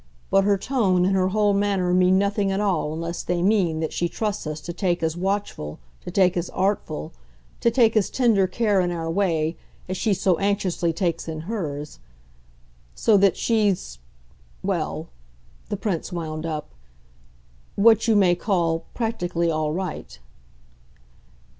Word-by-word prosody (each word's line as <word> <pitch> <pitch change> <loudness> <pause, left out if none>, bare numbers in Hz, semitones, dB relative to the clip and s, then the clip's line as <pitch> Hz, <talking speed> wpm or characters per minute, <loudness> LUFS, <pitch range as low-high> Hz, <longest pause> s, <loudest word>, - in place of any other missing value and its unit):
But 195 0 +4
her 200 -1 +3
tone 190 -6 +1
and 190 +1 +2
her 185 -1 +2
whole 205 +1 +2
manner 195 -3 +1
mean 185 +1 +4
nothing 200 0 +1
at 195 - -1
all 185 -7 0
unless 165 +2 -4
they 175 0 -1
mean 180 -6 +2
that 160 - -2
she 175 - -1
trusts 210 -3 -3
us 155 0 -4
to 170 - -6
take 175 -2 -1
as 160 0 0
watchful, 190 - -3 0.3
to - - -6
take 185 -2 +3
as 175 0 -2
artful, 185 - -2 0.5
to 235 - +3
take 230 -1 +3
as 210 -4 +2
tender 225 -7 +3
care, 205 0 +1
in 175 - 0
our 165 -2 -3
way, 165 -4 0 0.3
as 185 - -3
she 215 -1 +1
so 185 -2 +1
anxiously 195 -4 0
takes 170 -1 -2
in 155 -1 -4
hers. 155 -7 -5 1.0
So 220 - +3
that 195 -1 +3
she's 200 - 0 0.6
well," - - -2 0.6
the 205 - -2
Prince 190 -5 -3
wound 160 -2 -4
up, 155 -2 -5 1.0
"what 225 +2 +5
you 225 - +4
may 190 -4 +5
call 170 -3 0
practically 175 -7 -1
all 155 -1 -1
right." 155 - -5
185 Hz, 155 wpm, -23 LUFS, 165-205 Hz, 1.0 s, what